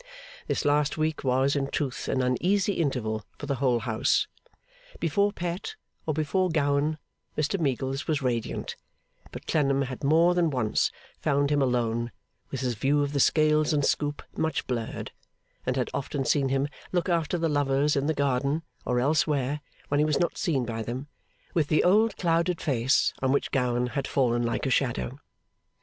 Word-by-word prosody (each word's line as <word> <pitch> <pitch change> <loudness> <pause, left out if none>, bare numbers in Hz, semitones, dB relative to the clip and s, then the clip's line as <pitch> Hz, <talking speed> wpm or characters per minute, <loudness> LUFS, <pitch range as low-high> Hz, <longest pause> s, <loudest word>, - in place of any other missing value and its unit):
This - - -1
last 145 0 +2
week 155 -1 -1
was, 130 +2 +2
in 140 -1 0
truth, 135 -2 -3
an 130 - +1
uneasy 185 +11 +2
interval 120 - -1
for - - -6
the 140 -1 -1
whole 125 -4 +2
house. 115 +4 +1 0.7
Before 200 +5 +2
Pet, 180 - -4 0.3
or 155 - +1
before 180 +5 +1
Gowan, 150 -1 +1 0.4
Mr 155 +6 0
Meagles 135 -2 -1
was 155 -3 +1
radiant; 120 -4 -2 0.6
but - - -9
Clennam 140 -3 +2
had 130 +2 -6
more 165 +5 +5
than 175 -2 +2
once 125 -7 +1 0.3
found 140 -1 +1
him 145 -1 +3
alone, 120 -2 0 0.4
with 135 - -4
his 125 -2 0
view 140 +6 +2
of 145 0 -3
the 140 - +1
scales 155 +2 +3
and 145 -2 +2
scoop 145 -1 0
much 160 -2 -1
blurred, 115 -3 -4 0.6
and 125 - +1
had 125 - -1
often 140 0 -2
seen 140 -1 +2
him 135 +1 +1 0.2
look 175 -2 0
after 170 -1 +1
the 165 -1 +1
lovers, 145 0 +2
in 140 +1 0
the 160 - +1
garden 140 +3 0 0.2
or 125 0 +1
elsewhere 145 0 +1 0.3
when 145 - +2
he - - +5
was 150 -2 +1
not 175 - 0
seen 140 -7 0
by 115 -1 -3
them, 125 +6 -5 0.4
with 160 -4 +2
the 155 - +3
old 215 +5 +4
clouded 170 0 +1
face 130 -2 +2
on 130 0 +2
which 140 - 0
Gowan 125 -2 +1
had 125 +3 -3
fallen 120 -3 +1
like 120 +3 -1
a 135 - 0
shadow. 120 - 0
140 Hz, 175 wpm, -27 LUFS, 130-155 Hz, 0.7 s, more